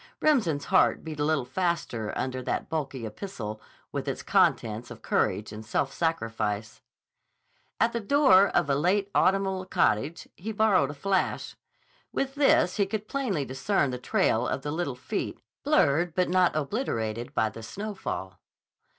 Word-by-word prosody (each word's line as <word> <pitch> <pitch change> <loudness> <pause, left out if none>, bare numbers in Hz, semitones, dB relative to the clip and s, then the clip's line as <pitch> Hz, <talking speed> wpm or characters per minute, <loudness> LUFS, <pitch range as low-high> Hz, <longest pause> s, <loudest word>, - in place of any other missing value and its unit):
Remsen's 200 - +2
heart - - +3
beat 155 -2 -7
a - - +1
little 150 -4 +1
faster 170 - -2
under 130 0 -2
that - - -3
bulky 140 -6 -3
epistle 110 - -6 0.3
with - - -4
its - - -3
contents 115 +2 +2
of 120 -2 -11
courage 105 +1 0
and 110 +1 -7
self 135 +5 -1
sacrifice. 110 -9 -2 1.0
At 230 +1 +3
the 235 - 0
door 205 -5 +5
of - - +1
a 140 - +2
late 195 +7 +1
autumnal 190 -1 +2
cottage 145 - 0
he 215 +5 -5
borrowed 205 -9 +3
a 145 - -6
flash. 190 +6 -1 0.6
With 270 0 -2
this 270 -10 +3
he 200 -2 +2
could 215 +1 -4
plainly 215 - -1
discern 135 +2 0
the 125 - -4
trail 120 -1 +1
of 135 - -2
the 145 - -3
little 155 -5 -2
feet, 125 - -4 0.2
blurred 160 +4 +2
but 180 -1 +2
not 180 -2 +3
obliterated 120 - -2
by 110 - +2
the 115 - -10
snowfall. 110 - -5
155 Hz, 155 wpm, -27 LUFS, 120-195 Hz, 1.0 s, door